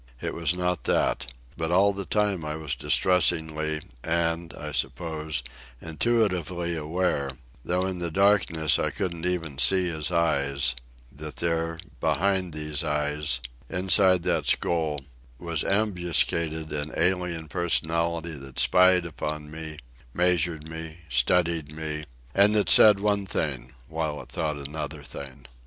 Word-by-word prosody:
It - - -3
was 85 0 0
not 90 -1 -1
that. 65 - +1 0.2
But 80 0 -2
all 100 +3 +4
the 100 -1 -5
time 105 -5 0
I 75 0 -3
was 80 -3 -3
distressingly, 80 -1 +1 0.2
and, 85 0 0
I 75 0 -6
suppose, 80 -3 -2 0.4
intuitively 85 - 0
aware, 80 -2 -1 0.3
though 90 +1 0
in 95 -1 -3
the 85 -1 -2
darkness 90 -4 +3
I - - +1
couldn't 90 -4 -3
even 80 -6 -2
see 95 +5 +4
his 80 0 -3
eyes, 70 -6 +1 0.4
that 75 +2 -8
there, 85 -1 -1 0.2
behind 95 -1 +1
those 75 0 -2
eyes, 75 -4 -1 0.3
inside 95 -1 +4
that - - 0
skull, 80 -4 +1 0.4
was 85 -1 -2
ambuscaded 85 -5 0
an 75 +1 -3
alien 90 -1 0
personality 85 0 0
that 65 -3 -10
spied 90 -1 +5
upon 75 -2 -5
me, 80 -1 -6 0.4
measured 85 -3 +2
me, 80 +1 -8
studied 80 +4 +1
me, 75 -1 -4 0.3
and 100 +2 +5
that 105 - +2
said 105 -2 +8
one 100 -1 0
thing 65 -7 -3
while 80 -2 -3
it - - -19
thought 75 -2 -2
another 75 +1 -6
thing. 70 -2 -9
80 Hz, 135 wpm, -26 LUFS, 75-90 Hz, 0.4 s, said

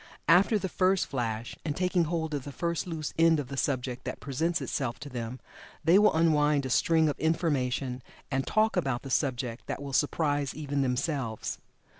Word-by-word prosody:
After 185 +7 +5
the 190 - -2
first 185 +1 +2
flash, 115 -3 -3
and 150 -3 -2
taking 180 -1 +1
hold 160 -1 -2
of 145 -3 -2
the 145 - -7
first 170 +3 -2
loose 160 -3 -4
end 165 -1 +5
of 140 - -5
the 140 - -5
subject 130 -2 -2
that 130 - -5
presents 160 +7 -1
itself 125 -4 -2
to 145 - -7
them, 125 0 -5 0.4
they 175 +4 +6
will 210 0 +5
unwind 150 -3 +3
a 130 - -3
string 160 +4 +3
of 145 - -2
information 135 -5 0 0.3
and 135 0 -1
"talk" 220 +1 +2
about 135 -2 0
the 135 - -7
subject 125 -3 -1
that - - -3
will 140 -1 -6
surprise 145 -1 +1
even 145 -2 -2
themselves. 125 -3 -2
145 Hz, 185 wpm, -29 LUFS, 130-165 Hz, 0.4 s, they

